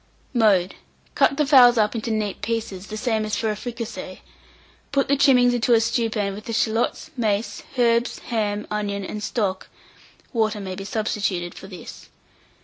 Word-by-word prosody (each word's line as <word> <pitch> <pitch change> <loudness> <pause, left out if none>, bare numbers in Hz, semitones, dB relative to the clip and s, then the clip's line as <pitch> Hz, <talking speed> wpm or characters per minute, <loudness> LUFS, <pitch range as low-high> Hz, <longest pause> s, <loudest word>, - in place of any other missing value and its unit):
Mode. 200 -6 +3 0.4
Cut 275 - +3
the 300 - +2
fowls 250 -4 +7
up 210 -1 +2
into 230 0 -3
neat 215 -3 -2
pieces, 205 -3 -3
the 215 - -6
same 220 -2 0
as 215 0 -2
for 220 -1 0
a - - -3
fricassee; 235 +1 -7 0.7
put 275 -1 +1
the 280 - +3
trimmings 255 -3 +5
into 240 0 +3
a - - +5
stewpan 225 -3 0
with 210 +2 -9
the 230 - -4
shalots, 225 +1 0
mace, 210 -3 -1 0.2
herbs, 235 -1 +2
ham, 210 -3 -2
onion, 200 -2 -2
and 210 - -5
stock 200 -3 -2 0.7
(water 220 -2 +1
may 190 -2 -5
be 195 +1 -7
substituted 200 -4 -2
for 190 - -11
this). 180 -4 -11
220 Hz, 165 wpm, -23 LUFS, 205-235 Hz, 0.7 s, fowls